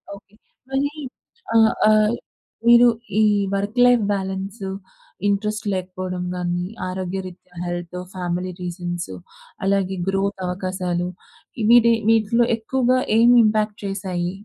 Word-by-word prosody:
Okay. 200 +1 -18 0.4
మరి 275 +2 0 0.7
ఆహ్, 220 -1 +5 0.2
ఆహ్, 215 +1 +4 0.5
మీరు 240 +1 +8 0.3
ఈ 220 - +5 0.3
వర్క్‌లైఫ్ 245 +4 +3
బాలన్స్, 195 +1 -3 0.6
ఇంట్రెస్ట్ 210 +2 -1
లేకపోవడం 185 -1 -4
గాని, 175 0 -2 0.3
ఆరోగ్యరీత్యా 185 -1 -6
హెల్త్, 175 0 -5 0.2
ఫ్యామిలీ 180 0 -3
రీజన్స్. 175 - -5 0.5
అలాగే 195 -1 +1
గ్రో‌త్ 195 0 -1
అవకాశాలు. 180 -1 -2 0.6
వీటి, 235 -1 +7 0.2
వీటిలో 225 +1 +3
ఎక్కువగా 255 +2 +1 0.2
ఏం 235 +2 +6
ఇంపాక్ట్ 215 -1 +1
చేసాయి? 185 -3 -3
195 Hz, 100 wpm, -22 LUFS, 180-220 Hz, 0.7 s, మీరు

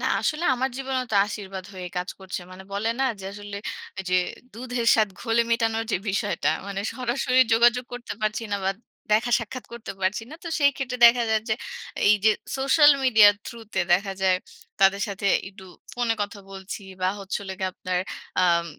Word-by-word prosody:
না - - -3 0.2
আসলে, 315 +2 -1
আমার 260 +1 0
জীবনেও 265 -1 -2
তো - - +3
আশীর্বাদ 195 -3 -6
হয়ে 185 -1 -6
কাজ 180 +1 -2
করছে। 190 -1 -5
মানে 185 +1 -10
বলে 205 +3 -1
না - - +3 0.2
যে, 190 - -9
আসলে 205 0 -8 0.5
যে, 185 - +1 0.4
"দুধের 245 +1 -3
স্বাদ 215 -2 +3
ঘোলে 230 0 +2
মেটানোর" 225 -1 +1
যে - - +3
বিষয়টা, 205 +1 0 0.2
মানে 200 -1 -3
সরাসরি 255 0 +1
যোগাযোগ 240 +2 +4
করতে 245 0 -6
পারছি 215 +1 -1
না - - +2
বাট, 195 - 0 0.4
দেখা-সাক্ষাৎ 240 +2 0
করতে 235 -4 -7
পারছি 190 +4 0
না। - - -8
তো - - -4
সেই 285 -1 +5
ক্ষেত্রে 250 -2 -3
দেখা 240 +1 +5
যায় 220 -1 +2
যে, 220 - +2 0.5
এই 210 - +7
যে 220 - +7 0.3
সোশ্যাল 275 +3 +6
মিডিয়ার 220 -5 +7
থ্রু 235 - -7 0.2
তে, 190 - +2
দেখা 195 +2 +2
যায় 185 -1 +4 0.4
তাদের 195 +1 +5
সাথে 200 0 -3 0.2
একটু 195 -1 -14 0.3
ফোনে 240 -2 0
কথা 205 0 -5
বলছি 195 +2 -7 0.2
বা 185 - +3
হচ্ছে 195 +1 -3
হোলো 190 -1 -5
গীয়ে 190 -1 -1
আপনার 180 0 -2 0.4
আএম 170 -2 +3
215 Hz, 185 wpm, -25 LUFS, 195-245 Hz, 0.5 s, এই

